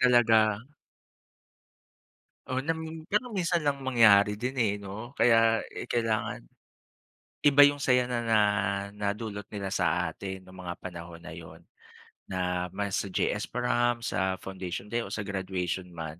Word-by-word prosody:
Talaga. 115 -4 +4 1.9
Oh, 130 - -2
nam 160 +2 -4
pero 230 +5 0
minsan 175 -5 0
lang 145 -1 0
mangyari 105 -5 +6
din, 125 +5 -4
eh, 110 -4 +2
'no 105 +6 -8
kaya, 115 -1 +4
eh, - - -7
kailangan, 115 -2 -1 1.0
iba 145 -1 +7
yung 145 - 0
saya 125 -2 +3
na 125 -1 -1
na 115 -1 +3 0.6
nadulot 105 0 -3
nila 100 -2 -4
sa 90 -2 +1
atin 95 +3 -7
nung 95 0 -11
mga 85 0 -6
panahon 85 -2 -8
na 80 -1 -9
'yun 80 -1 -11 0.7
na 90 -1 -1
mas 100 -1 -1
sa 100 - -3
JS 105 +3 -1
prom, 120 -1 0
sa 95 -3 0
Foundation 95 +1 -6
Day 120 - +1
o - - -4
sa 105 - -2
graduation 95 -2 -3
man 80 0 -6
105 Hz, 145 wpm, -28 LUFS, 95-120 Hz, 1.9 s, iba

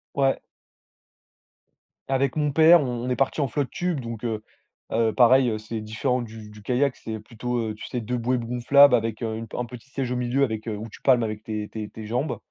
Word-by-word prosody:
Ouais. 135 -1 +2 1.7
Avec 135 -1 +1
mon 150 -1 +1
père, 160 +3 +7
on 125 -2 -3
on 125 - -2
est 125 - +1
partis 135 +3 0
en 140 - +1
flotte-tube, 150 +4 -2
donc 115 -2 -6
heu, 110 -2 -2 0.5
heu 115 -1 +2
pareil 125 +2 +5
heu, 110 - -1
c'est 110 +1 -5
différent 120 +4 -1
du 110 -2 -9
du 105 0 -13
kayak. 130 +4 +1
C'est 110 -1 -6
plutôt 120 +3 -4
heu. 110 -1 -2
Tu 105 - -9
sais? 125 - -3
2 125 +2 -3
bouées 125 +2 0
gonflables 125 +4 +5
avec 115 0 -2
heu, 110 -1 -2
une 115 0 -6
un 125 - -2
petit 125 +2 -12
siège 135 -2 -3
au - - 0
milieu 125 +3 +1
avec 110 -3 -2
heu, 110 - -2
où 110 +2 -6
tu - - -14
palmes 125 -4 +4
avec 110 -1 -4
tes 105 -2 -4
tes 105 -1 -6
tes 110 - -9
jambes. 125 +7 -2
120 Hz, 220 wpm, -25 LUFS, 110-135 Hz, 1.7 s, père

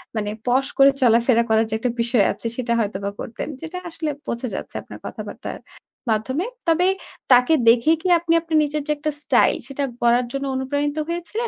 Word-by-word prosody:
মানে 210 -1 -1 0.2
posh 265 +3 +2
করে 275 0 +7
চলাফেরা 235 0 +4
করার 220 0 +3
যে 220 - -4
একটা 245 0 0
বিষয় 235 -3 +3
আছে, - - -9
সেটা 235 -2 -1
হয়তোবা 200 -2 -2
করতেন। 230 - -5
যেটা 330 +3 -6
আসলে 320 -2 -4 0.2
বোঝা 235 +2 -3
যাচ্ছে - - -6
আপনার - - -11
কথাবার্তার - - -7 0.5
মাধ্যমে। 260 - -1 0.2
তবে 340 +3 +3 0.4
তাকে 250 +5 +6
দেখে 235 +6 +5
কি 370 - -2
আপনি 330 0 0
আপনার 325 -1 0
নিজের 300 0 -2
যে - - +1
একটা 305 +1 -2
স্টাইল, 250 - +4
সেটা 280 0 -3 0.2
গড়ার 240 +1 +3
জন্য 275 0 -3
অনুপ্রাণিত 285 +3 -1
হয়েছিলেন 355 +7 -3
265 Hz, 180 wpm, -22 LUFS, 235-310 Hz, 0.5 s, করে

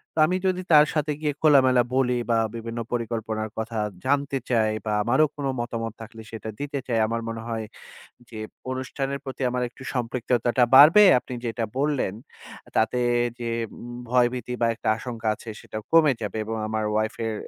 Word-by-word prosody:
তা - - -1
আমি 185 - 0
যদি 185 -1 0
তার 150 -1 +8
সাথে 150 -1 0
গিয়ে 150 -2 0
খোলামেলা 130 -5 +5
বলি 130 -2 +2 0.2
বা 115 - +3 0.2
বিভিন্ন 115 0 -5
পরিকল্পনার 110 -2 -3
কথা 110 +1 -4 0.3
জানতে 140 0 +1
চাই 110 -3 +2
বা 110 - -1
আমারও 130 +8 +4
কোন 145 - -4
মতামত 115 -2 -3
থাকলে 115 0 -10
সেটা 110 -1 -6
দিতে 145 0 -3
চাই। 115 -3 +1
আমার 115 +1 -2
মনে 115 0 -5
হয় 110 -1 -3 0.6
যে 115 - -9 0.3
অনুষ্ঠানের 135 +1 -3
প্রতি 135 0 -7
আমার 125 0 -1
একটু 130 - -14
সম্পৃক্ততাটা 120 0 0
বাড়বে। 155 +10 +9 0.2
আপনি 125 - -9
যেটা 115 0 -2
বললেন 140 -8 0 0.6
তাতে 110 +3 +2 0.4
যে 120 - -5 0.4
উম 120 0 -8
ভয়ভীতি 125 0 +1
বা 115 - +4
একটা - - -7
আশঙ্কা 115 -1 -5
আছে 115 - -11
সেটা - - -8
কমে 160 -4 +6
যাবে 105 0 -4
এবং 115 +1 -3
আমার 110 0 -2
ওয়াইফ 110 +1 0
এর 110 - -1
120 Hz, 170 wpm, -25 LUFS, 115-135 Hz, 0.6 s, বাড়বে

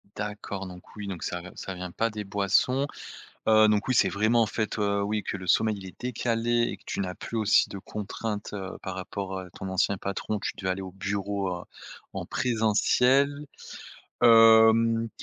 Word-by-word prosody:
D'accord, 105 -1 -5
donc 90 -1 -12
oui, 105 -1 -6
donc 95 -4 -5
ça 90 - -3
v 90 +1 -10
ça 95 - -6
vient 90 0 -6
pas 115 +6 0
des 105 -1 -5
boissons. 105 +8 +1 0.6
Heu, 110 -1 +6
donc 105 +2 +1
oui, 130 - +2
c'est - - +4
vraiment, 110 +3 +2
en - - +2
fait, 110 +1 -3
heu, 100 -1 +1
oui, 105 +1 -1
que - - -4
le 95 -1 -9
sommeil 110 +4 +3
il 95 - -9
est 95 - -12
décalé 120 -1 0
et - - -6
que - - -26
tu - - -3
n'as 90 -2 -3
plus 115 - -6
aussi 110 -2 +4
de 100 - -7
contraintes, 105 +1 -5
heu, 95 -2 -5
par 95 - -5
rapport 95 0 -5
à 90 -1 -8
ton 95 +2 -7
ancien 95 +1 +1
patron, 100 +3 -3
tu - - -3
devais 95 - -2
aller 95 +1 -2
au 95 - -7
bureau, 100 0 -2
heu, - - -9 0.5
en - - -5
présentiel. 125 +5 +2 0.8
Hem, 115 0 +6
105 Hz, 195 wpm, -27 LUFS, 95-115 Hz, 0.8 s, Heu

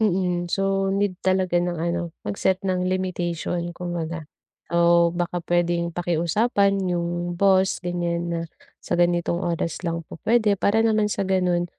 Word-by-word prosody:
Mm, 180 -4 +1
so 195 0 +1
need 200 -2 0
talaga 185 -2 +2
ng 175 -1 0
ano 170 0 -2
mag-set 185 - 0
ng 185 -1 -1
limitation 175 -2 -2
kumbaga, 170 -3 -5 0.4
o 170 0 +4
baka 175 0 -2
pwedeng 175 0 +1
pakiusapan 175 +5 +1 0.2
yung 175 0 -2
boss 190 +1 +3
ganyan 175 -1 -2
na 170 -1 -2 0.4
sa - - -7
ganitong 175 0 +1
oras 170 -2 -2
lang 170 -2 -3
po 160 - -11
pwede, 220 -2 +4
para 220 +2 +3
naman 215 -2 +2
sa 200 - -1
ganun 180 -2 +1
175 Hz, 145 wpm, -24 LUFS, 170-190 Hz, 0.4 s, o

